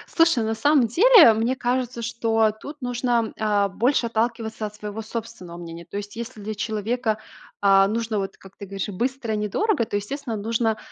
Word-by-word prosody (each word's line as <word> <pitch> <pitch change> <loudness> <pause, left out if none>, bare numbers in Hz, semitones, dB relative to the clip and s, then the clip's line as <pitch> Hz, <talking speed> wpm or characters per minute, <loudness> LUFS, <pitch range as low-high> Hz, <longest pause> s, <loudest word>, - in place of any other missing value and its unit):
Слушай, 330 -8 +4
на 220 0 -1
самом 275 0 +3
деле, 360 - +7
мне 230 +4 0
кажется, 250 -1 -2
что 225 -2 +1
тут 290 +1 -9
нужно, 240 -2 0
а, 205 -2 +2
больше 235 +4 +1
отталкиваться 225 -1 -2
от 210 - -6
своего 210 +1 -6
собственного 220 -6 -7
мнения. 170 -1 -9
То 200 - -7
есть, 205 +1 -7
если 230 -2 -7
для 215 +1 -5
человека, 220 +2 -1 0.4
а, 195 -1 +5
нужно, 225 0 -2
вот 195 -1 -5
как 195 0 -16
ты 200 - -8
говоришь, 195 0 -4
быстро 235 +3 -2
и - - 0
недорого, 235 - 0
то, 205 - -5
естественно, 235 +2 -4
нужно, 225 +1 0
225 Hz, 180 wpm, -23 LUFS, 210-245 Hz, 0.4 s, деле